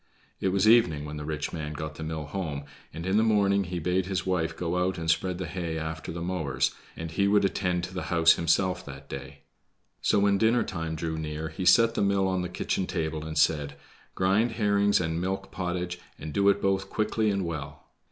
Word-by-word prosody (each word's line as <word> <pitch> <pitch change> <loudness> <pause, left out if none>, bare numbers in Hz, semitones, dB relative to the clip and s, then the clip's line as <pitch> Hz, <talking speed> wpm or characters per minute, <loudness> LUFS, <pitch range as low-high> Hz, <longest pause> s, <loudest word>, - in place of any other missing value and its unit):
It - - 0
was 95 +2 +2
evening 90 -11 +5
when 75 0 -6
the 75 - -5
rich 75 -1 -3
man 75 -2 -4
got 75 +1 -5
the 75 - -10
mill 80 -1 -4
home, 75 -5 -4 0.3
and 80 - -7
in 95 +2 +2
the 110 - +4
morning 100 -3 +3
he 90 0 -4
bade 90 +2 0
his 95 -2 -2
wife 85 -3 -1
go 90 +1 0
out 95 0 -1
and 80 -1 -4
spread 90 +2 0
the 95 - -4
hay 85 -1 -3
after 80 0 -4
the 85 0 -5
mowers, 85 -7 0 0.3
and 80 0 -5
he 100 +4 +2
would 100 0 +4
attend 90 -2 0
to 90 - -5
the 95 - -4
house 85 -2 +6
himself 90 +2 +1
that 70 -1 -10
day. 70 +1 -8 0.6
So - - +3
when 100 0 +3
dinner 115 +3 +3
time 80 -3 -4
drew 80 0 -3
near 80 +1 -4
he 80 +4 -5
set 115 +6 +6
the - - -1
mill 100 -1 +2
on 95 -1 0
the 90 - -3
kitchen 90 +1 -2
table 80 -3 -2
and 80 -1 -5
said: 75 -2 +2 0.4
"Grind 100 +5 +2
herrings 100 -2 +3
and 80 -1 -1
milk 95 +1 -3
pottage, 90 -1 -3 0.2
and 75 0 -7
do 100 +3 +4
it 100 0 +1
both 95 0 +1
quickly 110 0 0
and 100 -2 0
well." 75 -4 -6
90 Hz, 220 wpm, -27 LUFS, 80-95 Hz, 0.6 s, house